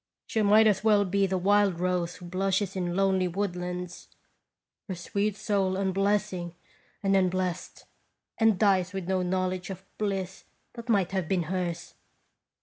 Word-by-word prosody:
She 225 Hz, -, -1 dB
might 210 Hz, +2 st, +6 dB
as 210 Hz, -2 st, +3 dB
well 210 Hz, -2 st, +4 dB
be 195 Hz, +1 st, +1 dB
the 190 Hz, 0 st, 0 dB
wild 200 Hz, -1 st, +3 dB
rose 180 Hz, -1 st, -1 dB
who 180 Hz, -, -11 dB
blushes 190 Hz, +2 st, -1 dB
in 175 Hz, -2 st, -2 dB
lonely 190 Hz, -1 st, +2 dB
woodlands, 180 Hz, -1 st, -4 dB, 0.8 s
her 190 Hz, -, -4 dB
sweet 200 Hz, +4 st, -2 dB
soul 195 Hz, -3 st, 0 dB
unblessing 195 Hz, -2 st, 0 dB, 0.5 s
and 195 Hz, 0 st, +3 dB
unblest, 185 Hz, -1 st, -1 dB, 0.5 s
and 225 Hz, -3 st, +4 dB
dies 190 Hz, -2 st, +2 dB
with 190 Hz, -3 st, -4 dB
no 190 Hz, -1 st, +1 dB
knowledge 185 Hz, 0 st, -1 dB
of 190 Hz, 0 st, -8 dB
bliss 195 Hz, -3 st, -3 dB, 0.3 s
that 235 Hz, 0 st, -10 dB
might 195 Hz, -5 st, +2 dB
have 190 Hz, -4 st, -1 dB
been 185 Hz, -3 st, +1 dB
hers. 175 Hz, 0 st, -3 dB
190 Hz, 145 wpm, -28 LUFS, 180-200 Hz, 0.8 s, might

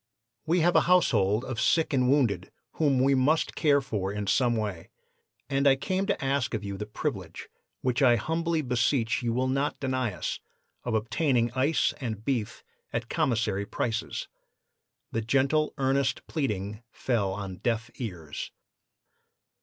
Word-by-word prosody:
"'We 170 Hz, +2 st, +3 dB
have 175 Hz, +2 st, +3 dB
a -, -, +7 dB
household 110 Hz, -, +3 dB
of 120 Hz, -4 st, -3 dB
sick 160 Hz, -2 st, +2 dB
and 125 Hz, -2 st, +3 dB
wounded 115 Hz, -10 st, +2 dB, 0.3 s
whom 140 Hz, -5 st, +3 dB
we 135 Hz, +1 st, +4 dB
must 140 Hz, +5 st, +2 dB
care 145 Hz, -2 st, +3 dB
for 105 Hz, -7 st, -3 dB
in 105 Hz, 0 st, -3 dB
some 120 Hz, +3 st, +2 dB
way, 105 Hz, -6 st, -3 dB, 0.6 s
and 140 Hz, 0 st, +2 dB
I 135 Hz, -, +6 dB
came 190 Hz, +8 st, -1 dB
to 140 Hz, -, -1 dB
ask 135 Hz, -4 st, 0 dB
of 105 Hz, -, -4 dB
you 100 Hz, -1 st, -4 dB
the 105 Hz, +2 st, -5 dB
privilege, 105 Hz, -, -5 dB, 0.3 s
which 125 Hz, +1 st, 0 dB
I 125 Hz, -3 st, +6 dB
humbly 160 Hz, +5 st, -1 dB
beseech 125 Hz, -1 st, +1 dB
you 120 Hz, -1 st, 0 dB
will 130 Hz, +3 st, 0 dB
not 135 Hz, +2 st, -1 dB
deny 130 Hz, -4 st, -1 dB
us, 90 Hz, -, -4 dB, 0.4 s
of 120 Hz, -2 st, -1 dB
obtaining 120 Hz, +2 st, +1 dB
ice 135 Hz, +6 st, +2 dB
and 110 Hz, -4 st, -4 dB
beef 115 Hz, -4 st, -2 dB, 0.3 s
at 115 Hz, 0 st, -3 dB
commissary 115 Hz, -, 0 dB
prices.' 115 Hz, -1 st, -3 dB, 0.8 s
"The 115 Hz, -, -1 dB
gentle, 135 Hz, +6 st, +2 dB
earnest 135 Hz, 0 st, +1 dB
pleading 105 Hz, -, -3 dB
fell 110 Hz, -8 st, -1 dB
on 95 Hz, -2 st, -6 dB
deaf 115 Hz, +1 st, -1 dB
ears. 90 Hz, -, -6 dB
125 Hz, 155 wpm, -28 LUFS, 110-140 Hz, 0.8 s, a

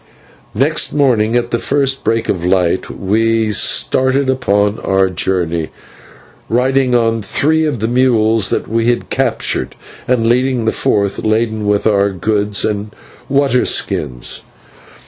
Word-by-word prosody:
Next 145 Hz, +7 st, +1 dB
morning, 120 Hz, -6 st, +2 dB
at 120 Hz, 0 st, -2 dB
the 115 Hz, -, 0 dB
first 135 Hz, 0 st, -1 dB
break 115 Hz, +1 st, 0 dB
of 90 Hz, -3 st, -2 dB
light, 90 Hz, 0 st, 0 dB
we 110 Hz, +2 st, 0 dB
started 130 Hz, +5 st, +1 dB
upon 105 Hz, -5 st, 0 dB
our 95 Hz, 0 st, +1 dB
journey, 85 Hz, -3 st, -1 dB, 0.8 s
riding 130 Hz, +1 st, +1 dB
on 115 Hz, -1 st, +1 dB
three 155 Hz, +10 st, +1 dB
of 150 Hz, -5 st, -1 dB
the 110 Hz, +1 st, -2 dB
mules 115 Hz, -4 st, +2 dB
that -, -, -2 dB
we 115 Hz, +1 st, 0 dB
had 120 Hz, 0 st, -1 dB
captured, 130 Hz, -4 st, -1 dB, 0.3 s
and 120 Hz, -3 st, +1 dB
leading 125 Hz, 0 st, +1 dB
the 110 Hz, -, +2 dB
fourth 100 Hz, -1 st, -1 dB
laden 110 Hz, -1 st, 0 dB
with 105 Hz, 0 st, +1 dB
our 100 Hz, -2 st, +2 dB
goods 105 Hz, +1 st, -1 dB
and 105 Hz, 0 st, -3 dB, 0.4 s
water 135 Hz, -2 st, +2 dB
skins. 60 Hz, -4 st, -2 dB
115 Hz, 135 wpm, -15 LUFS, 100-130 Hz, 0.8 s, morning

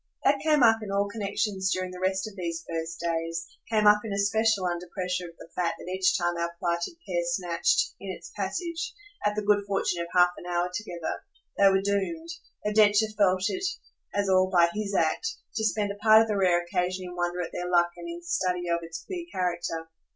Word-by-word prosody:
That 280 Hz, 0 st, +4 dB
came 300 Hz, -3 st, +3 dB
up 225 Hz, -1 st, +5 dB
in 210 Hz, -, -6 dB
all 200 Hz, +1 st, +1 dB
connexions 200 Hz, -2 st, -1 dB
during 185 Hz, -1 st, -1 dB
the 180 Hz, -, -8 dB
rest 190 Hz, +2 st, 0 dB
of 210 Hz, -, -10 dB
these 170 Hz, -3 st, -4 dB
first 165 Hz, 0 st, -4 dB
days; 165 Hz, 0 st, -2 dB, 0.2 s
came 215 Hz, -2 st, +2 dB
up 210 Hz, 0 st, +7 dB
in 220 Hz, -, -5 dB
especial 205 Hz, 0 st, +2 dB
under 175 Hz, 0 st, -2 dB
pressure 180 Hz, -1 st, -3 dB
of 165 Hz, -, -18 dB
the -, -, -12 dB
fact 175 Hz, -2 st, 0 dB
that 180 Hz, -, -8 dB
each 185 Hz, 0 st, +3 dB
time 175 Hz, 0 st, 0 dB
our 170 Hz, 0 st, -2 dB
plighted 170 Hz, -, -1 dB
pair 175 Hz, -2 st, 0 dB
snatched, 180 Hz, -, +1 dB
in -, -, -7 dB
its -, -, -9 dB
passage, 345 Hz, +2 st, -3 dB, 0.3 s
at 210 Hz, 0 st, +1 dB
the 210 Hz, -, -1 dB
good 205 Hz, 0 st, +3 dB
fortune 195 Hz, -3 st, 0 dB
of 170 Hz, -, -3 dB
half 180 Hz, 0 st, +5 dB
an 175 Hz, -, -10 dB
hour 175 Hz, 0 st, 0 dB
together, 175 Hz, -5 st, -4 dB, 0.3 s
they 200 Hz, 0 st, +6 dB
were 195 Hz, 0 st, +3 dB
doomed 200 Hz, -, -1 dB, 0.4 s
though 210 Hz, -, 0 dB
Densher 210 Hz, 0 st, +5 dB
felt 190 Hz, -3 st, +3 dB
it 375 Hz, -, -2 dB, 0.5 s
as 200 Hz, 0 st, +1 dB
all 185 Hz, 0 st, +4 dB
by 175 Hz, -2 st, +5 dB
HIS 210 Hz, -2 st, -3 dB
act 170 Hz, -, +1 dB, 0.2 s
to 220 Hz, -, 0 dB
spend 210 Hz, -2 st, +1 dB
a -, -, -6 dB
part 220 Hz, 0 st, +7 dB
of -, -, -4 dB
the 210 Hz, -, 0 dB
rare 180 Hz, -3 st, +3 dB
occasion 180 Hz, +1 st, -1 dB
in 180 Hz, 0 st, -8 dB
wonder 175 Hz, 0 st, -1 dB
at 175 Hz, -, -3 dB
their 180 Hz, 0 st, -4 dB
luck 175 Hz, -1 st, +3 dB
and 340 Hz, -, -8 dB
in 340 Hz, +1 st, -7 dB
study 180 Hz, -, -1 dB
of 170 Hz, 0 st, +2 dB
its 165 Hz, 0 st, -7 dB
queer 350 Hz, -2 st, -5 dB
character. 170 Hz, -3 st, -2 dB
185 Hz, 215 wpm, -27 LUFS, 175-210 Hz, 0.5 s, up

